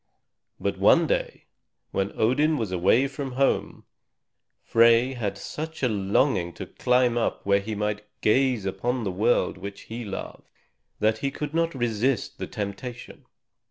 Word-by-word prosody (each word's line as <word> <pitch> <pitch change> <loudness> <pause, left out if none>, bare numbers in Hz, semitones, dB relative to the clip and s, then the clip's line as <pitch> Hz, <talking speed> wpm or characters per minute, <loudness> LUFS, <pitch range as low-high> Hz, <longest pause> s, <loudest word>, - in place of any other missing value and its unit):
But - - -2
one - - +5
day, - - -2 0.5
when 95 0 -1
Odin 150 +7 +3
was 110 -5 -2
away 95 +9 +3
from 135 -1 -6
home, 135 +1 0 0.8
Frey 115 +2 +4
had 105 -5 -3
such 155 +8 -6
a - - +5
longing 100 -3 +1
to - - -7
climb 125 -1 +2
up - - -2
where 100 0 +4
he 105 +2 -5
might 105 0 -2
gaze 125 -1 +2
upon 95 +6 -1
all 125 - -3
the 100 - -1
world 100 -1 +1
which 100 +1 -7
he 115 +2 -7
loved, 100 -3 -7 0.5
that 110 +1 +1
he 140 - -1
could 145 +2 -5
not 165 -1 0
resist 120 +1 -1
the - - -4
temptation. 105 +4 -7
115 Hz, 155 wpm, -25 LUFS, 100-135 Hz, 0.8 s, one